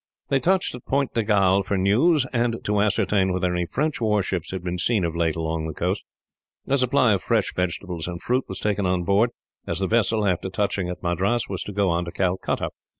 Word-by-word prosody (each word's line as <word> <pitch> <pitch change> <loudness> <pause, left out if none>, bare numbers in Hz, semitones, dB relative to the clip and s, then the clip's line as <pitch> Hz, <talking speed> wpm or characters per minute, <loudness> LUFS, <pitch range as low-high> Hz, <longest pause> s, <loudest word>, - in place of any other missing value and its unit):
They 135 - +3
touched 185 +5 +1
at 125 - -9
Point 140 0 0
de 115 - +1
Galle 100 -2 +3
for 100 0 -1
news, 125 - +3
and 120 -1 +1
to 105 0 +1
ascertain 100 -2 +2
whether 90 0 0
any 90 -1 -1
French 155 - -1
warships 100 -6 0
had 95 -2 -5
been 90 0 -3
seen, 105 -2 +1
of 85 0 -3
late, 85 -2 +1
along 80 -1 -2
the 80 - -6
coast. - - -1 0.7
A 135 - +2
supply 125 -3 +3
of 95 - 0
fresh 115 -4 0
vegetables 90 -1 -2
and 85 -1 -5
fruit 125 +6 0
was 95 - -6
taken 100 -2 0
on 90 -1 0
board, 100 +6 +3 0.4
as 85 - -1
the 95 - 0
vessel, 110 0 +2
after 95 0 0
touching 95 -2 -1
at 90 0 -6
Madras, 95 +7 0
was 95 -2 -4
to - - -5
go 100 -2 +1
on 85 +1 0
to 85 - -6
Calcutta. 95 +1 -1
100 Hz, 215 wpm, -24 LUFS, 90-115 Hz, 0.7 s, They